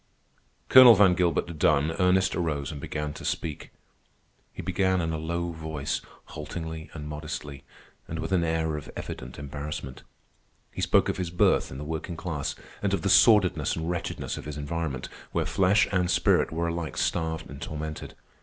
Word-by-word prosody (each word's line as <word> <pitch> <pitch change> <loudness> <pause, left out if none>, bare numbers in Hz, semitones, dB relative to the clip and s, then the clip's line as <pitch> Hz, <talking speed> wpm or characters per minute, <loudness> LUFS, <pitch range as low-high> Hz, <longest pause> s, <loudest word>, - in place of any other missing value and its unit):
Colonel 130 -3 +10
Van 95 -2 +6
Gilbert 85 -2 0
done, 75 +3 +3
Ernest 95 +1 +3
arose 75 -6 -2
and 75 -2 -7
began 75 0 -4
to - - -10
speak. 75 -3 -3 0.8
He - - -8
began 95 -1 +1
in 80 -1 -1
a 80 - -2
low 85 +2 -2
voice, 80 -3 -3 0.3
haltingly 80 +1 -6
and 75 -2 -6
modestly, 75 -2 -6 0.4
and 80 - -5
with 80 +2 -4
an 90 -3 +3
air 80 -1 0
of 75 - -8
evident 60 - -7
embarrassment. 70 -2 -6 0.7
He - - -6
spoke - - +3
of - - -1
his 90 -2 -2
birth 85 - +2
in 65 - -8
the 75 - -6
working 80 +2 -5
class, 75 -6 -3 0.3
and - - +1
of - - -5
the - - +1
sordidness 90 -9 +5
and 80 +1 -2
wretchedness 90 - -4
of - - -8
his 75 -1 -6
environment, 75 -3 -3 0.3
where - - +1
flesh 95 +2 +3
and 90 -2 +1
spirit - - +3
were 85 +1 -1
alike 85 -1 -4
starved 80 -2 -1
and 70 -1 -10
tormented. 75 0 -6
80 Hz, 175 wpm, -27 LUFS, 75-85 Hz, 0.8 s, Colonel